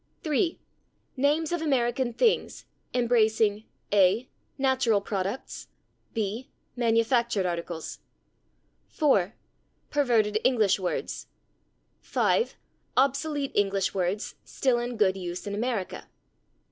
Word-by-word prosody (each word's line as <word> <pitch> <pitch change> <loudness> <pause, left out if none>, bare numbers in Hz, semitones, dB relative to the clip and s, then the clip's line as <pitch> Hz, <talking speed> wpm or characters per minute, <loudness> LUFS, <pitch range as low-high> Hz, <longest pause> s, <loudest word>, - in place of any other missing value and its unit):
3. 320 +3 0 0.6
Names 295 +4 +1
of 345 -2 -1
American 255 -4 +1
things, 445 - +1 0.3
embracing: 220 -3 +2 0.3
a. 205 +5 +4 0.3
Natural 260 -5 +2
products. 200 +4 -4 0.5
b. 220 +3 -2 0.3
Manufactured 230 -3 +2
articles. 170 -2 -4 0.9
4. 225 - +2 0.6
Perverted 230 -7 +2
English 215 -7 +3
words. 180 -2 -3 0.7
5. 475 - +1 0.4
Obsolete 280 +2 +1
English 195 -1 +1
words 190 +3 -1
still 255 -3 +1
in 240 0 -4
good 195 -3 +3
use 180 0 -5
in 200 - -4
America. 220 -2 -3
230 Hz, 95 wpm, -27 LUFS, 200-265 Hz, 0.9 s, a